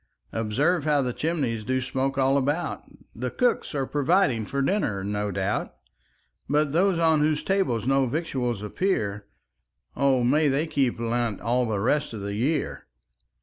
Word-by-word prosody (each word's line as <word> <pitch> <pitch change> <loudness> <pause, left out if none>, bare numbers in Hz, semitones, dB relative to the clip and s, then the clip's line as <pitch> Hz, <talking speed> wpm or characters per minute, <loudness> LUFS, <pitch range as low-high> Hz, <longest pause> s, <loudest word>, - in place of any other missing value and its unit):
Observe 140 +10 +1
how 145 -2 +3
the 125 -1 -2
chimneys 135 -9 -1
Do 130 +4 0
smoke 130 +2 -2
all 135 0 +3
about; 145 +5 -1 0.3
The 125 +2 -3
cooks 245 - 0
are 135 -1 0
providing 145 - +1
For 140 0 -1
dinner, 135 - 0
no 105 +1 -2
doubt; 100 +1 -2 0.7
But 150 0 +2
those 180 +3 +2
on 160 -2 +3
whose 150 0 +1
tables 185 - 0
No 135 0 +3
victuals 125 - -2
appear, 105 - -1 0.7
O 135 -3 +2
may 150 +5 +3
they 140 +3 +1
keep 135 -7 0
Lent 115 -2 -1
All 120 +2 0
the 105 -3 -1
rest 130 +6 0
of 110 - -6
the 100 0 -4
year. 135 +8 -1
135 Hz, 155 wpm, -25 LUFS, 115-150 Hz, 0.7 s, how